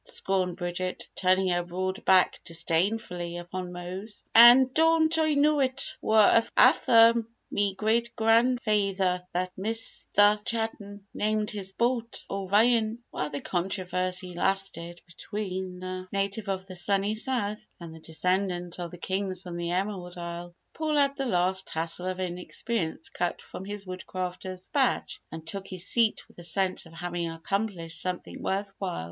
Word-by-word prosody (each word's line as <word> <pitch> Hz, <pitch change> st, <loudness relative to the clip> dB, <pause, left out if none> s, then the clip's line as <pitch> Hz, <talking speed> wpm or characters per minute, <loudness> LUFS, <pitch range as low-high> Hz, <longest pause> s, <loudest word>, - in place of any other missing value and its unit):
scorned 190 Hz, -, -1 dB
Bridget, 180 Hz, 0 st, -3 dB
turning 185 Hz, 0 st, +2 dB
her 175 Hz, 0 st, +1 dB
broad 185 Hz, +2 st, -4 dB
back 185 Hz, -1 st, +4 dB
disdainfully 175 Hz, +1 st, -1 dB
upon 180 Hz, +1 st, -6 dB
Mose. 185 Hz, +4 st, -6 dB
"An' 245 Hz, +3 st, +9 dB
don't 325 Hz, 0 st, +4 dB
Oi 315 Hz, -2 st, +2 dB
know 295 Hz, +1 st, +3 dB
it 260 Hz, -1 st, +1 dB
war 215 Hz, -1 st, +5 dB, 0.3 s
afther 230 Hz, -1 st, +7 dB, 0.4 s
me 200 Hz, -1 st, 0 dB
great 230 Hz, +3 st, 0 dB
grand 230 Hz, +2 st, +3 dB
fayther 195 Hz, -4 st, +1 dB
that 180 Hz, +1 st, -1 dB
Misther 210 Hz, 0 st, +2 dB
Cha'ton 210 Hz, -3 st, -4 dB
named 215 Hz, +1 st, 0 dB
his 195 Hz, -3 st, -3 dB
boat 235 Hz, +1 st, -1 dB
'O'ryan'!" 215 Hz, +4 st, +2 dB
While 150 Hz, -, -3 dB
the 145 Hz, -1 st, -5 dB
controversy 185 Hz, 0 st, -1 dB
lasted 175 Hz, -2 st, -1 dB
between 185 Hz, +1 st, -5 dB
the 185 Hz, 0 st, -6 dB
native 200 Hz, +1 st, -2 dB
of 190 Hz, -1 st, -2 dB
the 185 Hz, -1 st, -9 dB
Sunny 200 Hz, +3 st, +1 dB
South 215 Hz, -3 st, -2 dB
and 170 Hz, -2 st, -9 dB
the 160 Hz, -, -11 dB
descendant 180 Hz, +2 st, -1 dB
of 175 Hz, -1 st, -5 dB
Kings 190 Hz, -1 st, -2 dB
from 175 Hz, -1 st, -7 dB
the 170 Hz, 0 st, -3 dB
Emerald 180 Hz, -1 st, -3 dB
Isle, 170 Hz, 0 st, -7 dB, 0.2 s
Paul 310 Hz, -1 st, -1 dB
had 280 Hz, -1 st, +3 dB
the 275 Hz, -2 st, -2 dB
last 190 Hz, -1 st, +1 dB
tassel 165 Hz, +3 st, -2 dB
of 185 Hz, 0 st, -3 dB
inexperience 180 Hz, -2 st, -3 dB
cut 175 Hz, +3 st, -2 dB
from 190 Hz, -, -9 dB
his 205 Hz, 0 st, -5 dB
Woodcrafter's 185 Hz, 0 st, -6 dB
Badge 270 Hz, -3 st, 0 dB
and 160 Hz, 0 st, -8 dB
took 195 Hz, +3 st, -6 dB
his 185 Hz, -1 st, -2 dB
seat 230 Hz, -2 st, +2 dB
with -, -, -18 dB
a -, -, -9 dB
sense 185 Hz, +1 st, 0 dB
of 165 Hz, -, -16 dB
having 175 Hz, 0 st, -3 dB
accomplished 170 Hz, 0 st, -3 dB
something 180 Hz, -1 st, -4 dB
worth 195 Hz, +1 st, -2 dB
while. 185 Hz, -3 st, -3 dB
190 Hz, 150 wpm, -27 LUFS, 180-215 Hz, 0.4 s, An